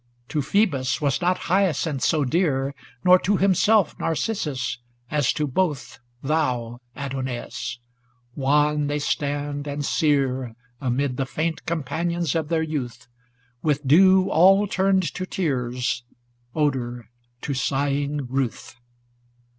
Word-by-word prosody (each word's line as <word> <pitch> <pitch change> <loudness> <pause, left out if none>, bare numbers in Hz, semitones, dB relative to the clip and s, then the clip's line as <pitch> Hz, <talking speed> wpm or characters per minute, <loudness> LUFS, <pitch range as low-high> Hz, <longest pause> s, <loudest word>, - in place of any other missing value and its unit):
To 155 - -1
Phcebus 145 -4 +1
was 145 +3 0
not 180 +1 +2
Hyacinth 170 -6 +1
so 155 -4 +2
dear, 140 -2 +1 0.3
Nor 180 0 +7
to 200 +2 +1
himself 200 +1 +3
Narcissus, 150 - -2 0.3
as 145 -4 +2
to 150 - -1
both 145 -1 -2 0.3
Thon, 125 -6 -1 0.2
Adonais; 130 -3 -4 0.6
wan 150 +2 +2
they 145 0 -1
stand 145 0 -2
and 145 0 -3
sere 135 -6 +1 0.2
Amid 130 0 -1
the 135 - -1
faint 160 +4 -3
companions 170 +1 -1
of 160 -2 -1
their 165 -1 +1
youth, 145 -7 -4 0.6
With 150 -2 0
dew 185 +5 +6
all 195 +5 +6
turned 190 -1 +2
to 185 0 -4
tears; 125 -8 -1 0.5
odor, 125 -6 -1 0.3
to 140 - -3
sighing 140 +2 -1
ruth. 125 -1 -3
145 Hz, 115 wpm, -24 LUFS, 135-170 Hz, 0.6 s, Nor